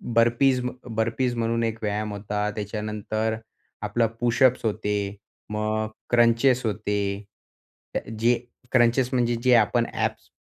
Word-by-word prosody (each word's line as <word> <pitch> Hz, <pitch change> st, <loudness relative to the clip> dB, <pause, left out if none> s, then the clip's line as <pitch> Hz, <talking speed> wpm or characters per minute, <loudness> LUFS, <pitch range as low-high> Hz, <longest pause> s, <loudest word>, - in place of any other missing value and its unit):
Burpees, 120 Hz, +3 st, +4 dB
म 125 Hz, -, -1 dB
अ, -, -, -13 dB
burpees 115 Hz, +3 st, 0 dB
म्हणून 115 Hz, 0 st, 0 dB
एक 115 Hz, -1 st, -1 dB
व्यायाम 105 Hz, 0 st, -1 dB
होता. 105 Hz, +1 st, -2 dB
त्याच्यानंतर 105 Hz, +1 st, -2 dB, 0.5 s
आपला 115 Hz, -1 st, +1 dB
पुशअप्स 120 Hz, +1 st, +3 dB
होते. 105 Hz, -1 st, -1 dB, 0.6 s
मग 110 Hz, 0 st, -1 dB, 0.2 s
क्रंचेस 120 Hz, +2 st, +4 dB
होते 105 Hz, -1 st, -1 dB, 1.0 s
ते -, -, +2 dB
अ, -, -, -13 dB
जे 120 Hz, +2 st, +4 dB, 0.4 s
क्रंचेस 120 Hz, 0 st, +3 dB
म्हणजे 120 Hz, -1 st, +2 dB
जे 130 Hz, -1 st, +5 dB
आपण 115 Hz, +1 st, +3 dB
ॲब्स -, -, -2 dB
115 Hz, 130 wpm, -25 LUFS, 105-120 Hz, 1.0 s, जे